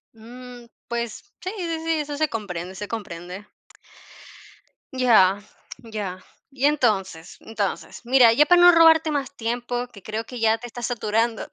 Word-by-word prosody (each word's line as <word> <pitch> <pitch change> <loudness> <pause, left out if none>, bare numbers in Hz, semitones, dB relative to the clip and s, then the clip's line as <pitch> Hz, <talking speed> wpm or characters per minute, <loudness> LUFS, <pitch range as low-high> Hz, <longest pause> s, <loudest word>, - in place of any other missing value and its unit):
Mm, 245 +2 -12 0.2
pues, 235 - -5
sí, 370 - -4
sí, 335 -3 -3
sí, 330 - 0
eso 290 -1 -4
se 310 0 0
comprende, 185 -4 -6
se 205 +2 -6
comprende. 190 -2 -7 1.5
Ya, 205 -6 +4 0.4
ya. 205 -6 -6 0.3
Y 270 0 -2
entonces, 205 - 0
entonces, 215 -3 -5
mira, 245 -1 +5
ya 290 +6 +4
para 355 +2 +5
no 355 0 +9
robarte 325 -1 +5
más 280 -2 -3
tiempo, 245 +1 -3
que 200 -6 -16
creo 215 +1 -4
que 245 +2 -9
ya 225 0 +2
te 240 - -8
estás 240 0 -6
saturando, 225 -1 -1
235 Hz, 150 wpm, -23 LUFS, 210-270 Hz, 1.5 s, no